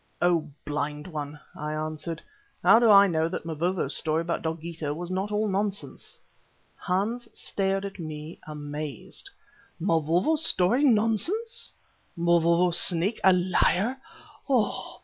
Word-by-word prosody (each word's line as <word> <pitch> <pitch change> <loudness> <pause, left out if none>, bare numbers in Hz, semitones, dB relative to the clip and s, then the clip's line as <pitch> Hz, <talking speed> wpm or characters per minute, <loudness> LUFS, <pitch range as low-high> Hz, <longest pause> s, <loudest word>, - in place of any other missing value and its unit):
"Oh! 170 -3 +2 0.2
blind 150 0 -3
one," 150 -3 -6 0.2
I 150 0 -4
answered, 155 +1 -4 0.4
"how 225 - +7
do 235 -2 +4
I 200 -1 +9
know 160 -3 +1
that 170 - -5
Mavovo's 170 +3 -1
story 160 0 +1
about 170 0 -2
Dogeetah 160 -2 -4
was 175 +2 -5
not 190 +3 -2
all 210 +1 +1
nonsense?" 200 0 -3 0.6
Hans 210 +7 -2
stared 195 0 -1
at 195 -1 -7
me 155 0 -7
amazed. 150 -1 -5 0.5
"Mavovo's 175 - +2
story 235 - +3
nonsense! 340 - +1 0.5
Mavovo's 170 +1 +3
Snake 185 +5 0
a 190 - +7
liar! 185 +6 +2
175 Hz, 120 wpm, -27 LUFS, 155-200 Hz, 0.6 s, I